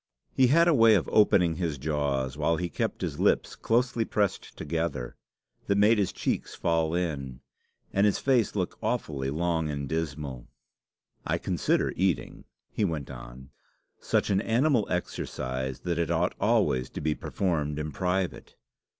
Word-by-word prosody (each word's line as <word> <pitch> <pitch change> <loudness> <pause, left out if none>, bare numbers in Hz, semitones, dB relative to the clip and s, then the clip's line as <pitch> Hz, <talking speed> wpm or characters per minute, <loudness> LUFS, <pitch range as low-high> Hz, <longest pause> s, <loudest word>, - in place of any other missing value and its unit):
He 130 - +4
had 165 +6 +5
a 170 - +5
way 115 -4 +6
of 90 - +1
opening 90 -6 +4
his 85 -5 -2
jaws 70 -2 -1
while 85 0 +1
he 90 +1 -2
kept - - -3
his - - -3
lips - - +2
closely 120 0 +1
pressed 105 -3 -2
together, 80 -7 -3 0.5
that 100 - +2
made 105 +2 +5
his 100 - +1
cheeks - - -2
fall 80 -1 0
in, 70 -7 -3 0.5
and 100 - +3
his 105 - +2
face 125 -6 +1
look - - -2
awfully 65 -3 -2
long 80 +1 0
and 70 -1 -3
dismal. 70 -5 -4 0.8
"I - - 0
consider - - 0
eating," 90 -8 -1 0.3
he - - -1
went 80 -8 -2
on, 65 +2 -11 0.5
"such - - 0
an 95 0 +2
animal 120 +1 +2
exercise 65 -7 -3
that 85 -1 -2
it 85 - 0
ought - - +1
always 65 0 +2
to - - -7
be 75 0 0
performed 75 -5 -2
in 75 0 -3
private. 90 +5 -2
80 Hz, 155 wpm, -28 LUFS, 70-100 Hz, 0.8 s, way